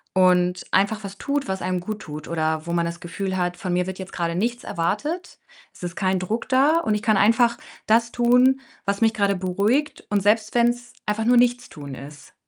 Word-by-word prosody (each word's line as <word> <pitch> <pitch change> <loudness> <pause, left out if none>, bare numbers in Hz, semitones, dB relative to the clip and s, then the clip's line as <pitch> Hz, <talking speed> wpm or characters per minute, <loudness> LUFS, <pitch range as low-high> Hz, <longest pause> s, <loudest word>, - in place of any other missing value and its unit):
und 180 -1 +3
einfach 200 +3 +1
was 200 0 -8
tut, 280 0 -2
was 190 0 -3
einem 185 0 -1
guttut 175 -6 -7
oder 160 -1 -1
wo 170 - -2
man 170 -1 +1
das 170 0 -6
Gefühl 190 +2 -4
hat: 180 -1 -1
„Von 180 0 -3
mir 180 0 +1
wird 190 0 -6
jetzt 190 - -8
grade 170 -1 -1
nichts 235 +5 -1
erwartet. 290 - -3 0.4
Es - - -14
ist 175 0 -5
kein 190 -1 +1
Druck 215 +8 -3
da 280 +5 +4
und 220 -10 0
ich 210 - -3
kann 215 -3 +3
einfach 235 +3 +4 0.3
das 230 +2 +3
tun, 250 +2 +4 0.2
was 200 +1 -1
mich 225 0 +4
grade 200 -2 +1
beruhigt 200 +11 0
und 205 -1 +1
selbst 215 +1 +2
wenn's 240 0 +1
einfach 215 +1 -1
nur 245 +1 +5
Nichtstun 240 - 0
ist.“ 140 +2 -12
200 Hz, 200 wpm, -23 LUFS, 180-235 Hz, 0.4 s, nur